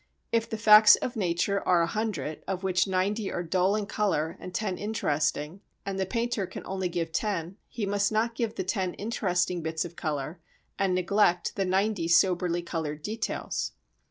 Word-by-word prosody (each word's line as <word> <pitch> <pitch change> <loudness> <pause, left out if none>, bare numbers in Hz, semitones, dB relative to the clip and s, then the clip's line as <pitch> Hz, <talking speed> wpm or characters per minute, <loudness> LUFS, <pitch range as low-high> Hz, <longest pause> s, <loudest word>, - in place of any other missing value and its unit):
If 230 0 +1
the 220 - -3
facts 215 -1 +8
of 245 - -4
nature 195 0 0
are 175 -2 +4
a - - +3
hundred, 170 -7 -3
of 190 -1 -3
which 185 0 +2
ninety 195 +3 0
are 175 - -2
dull 185 +4 +2
in 215 -1 -1
colour 190 -6 -1
and 185 - -8
ten 190 -1 -2
interesting, 155 -4 -1 0.2
and 195 -1 -3
the 190 - 0
painter 230 -2 -1
can - - -8
only 190 -1 -2
give 170 -1 -2
ten, 190 -1 -2
he 225 -3 -4
must 200 +1 +1
not 225 +2 +1
give 230 -1 -2
the - - -2
ten 185 -1 -2
interesting 180 -5 -1
bits 160 0 -2
of 170 0 -9
colour 155 +1 -3 0.4
and 190 -2 +2
neglect 180 -1 +2
the 195 - 0
ninety 190 -1 +1
soberly 175 0 +3
coloured 155 -3 -4
details. 220 +5 -3
190 Hz, 180 wpm, -28 LUFS, 170-210 Hz, 0.4 s, facts